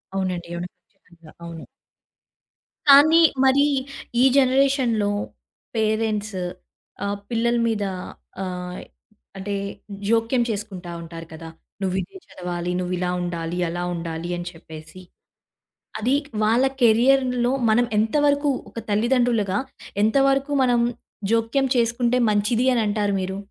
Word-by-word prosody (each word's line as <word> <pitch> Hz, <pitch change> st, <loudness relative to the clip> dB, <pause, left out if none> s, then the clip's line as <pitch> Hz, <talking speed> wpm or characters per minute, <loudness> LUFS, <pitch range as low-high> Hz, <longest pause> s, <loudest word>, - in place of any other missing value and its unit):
అవునండి. 180 Hz, -3 st, -2 dB
అవును. 175 Hz, +1 st, -4 dB, 0.2 s
ఖచ్చితంగా! 170 Hz, -5 st, -19 dB
అవును. 165 Hz, -1 st, -8 dB, 1.2 s
కానీ 295 Hz, +4 st, +8 dB, 0.2 s
మరి 275 Hz, +2 st, +5 dB, 0.6 s
ఈ -, -, +6 dB
జనరేషన్‌లో 260 Hz, -5 st, +3 dB, 0.6 s
పేరెంట్స్ 215 Hz, -2 st, 0 dB, 0.7 s
ఆహ్, 200 Hz, 0 st, -2 dB
పిల్లల 235 Hz, +1 st, +1 dB
మీద 220 Hz, -2 st, 0 dB, 0.6 s
ఆహ్, 180 Hz, -1 st, -5 dB, 0.6 s
అంటే 200 Hz, +1 st, -3 dB, 0.5 s
జోక్యం 230 Hz, +2 st, +2 dB
చేసుకుంటా 195 Hz, -5 st, -5 dB
ఉంటారు 165 Hz, 0 st, -9 dB
కదా! 165 Hz, 0 st, -9 dB, 0.3 s
"నువ్వు 185 Hz, -1 st, -1 dB
ఇదే 185 Hz, -, -10 dB
చదవాలి, 175 Hz, -1 st, -4 dB
నువ్వు 180 Hz, 0 st, -2 dB
ఇలా 180 Hz, 0 st, -1 dB
ఉండాలి, 170 Hz, -1 st, -3 dB
అలా 175 Hz, +1 st, -3 dB
ఉండాలి" 165 Hz, 0 st, -5 dB
అని 175 Hz, 0 st, -6 dB
చెప్పేసి. 160 Hz, +1 st, -12 dB, 1.0 s
అది 245 Hz, +5 st, +2 dB, 0.3 s
వాళ్ళ 230 Hz, +5 st, +3 dB, 0.2 s
కెరియర్‌లో 250 Hz, +1 st, +4 dB, 0.2 s
మనం 240 Hz, +3 st, +4 dB
ఎంత 220 Hz, +1 st, 0 dB
వరకు 285 Hz, +1 st, +2 dB, 0.2 s
ఒక -, -, -6 dB
తల్లిదండ్రులుగా, 225 Hz, -2 st, +2 dB, 0.4 s
ఎంత 220 Hz, +5 st, +3 dB
వరకు 275 Hz, +1 st, 0 dB
మనం 245 Hz, -2 st, +3 dB, 0.5 s
జోక్యం 230 Hz, +4 st, +1 dB
చేసుకుంటే 235 Hz, +1 st, +1 dB
మంచిది 210 Hz, +4 st, +1 dB
అనంటారు 210 Hz, -3 st, 0 dB
మీరు. 190 Hz, +1 st, -4 dB
215 Hz, 110 wpm, -23 LUFS, 180-240 Hz, 1.2 s, కానీ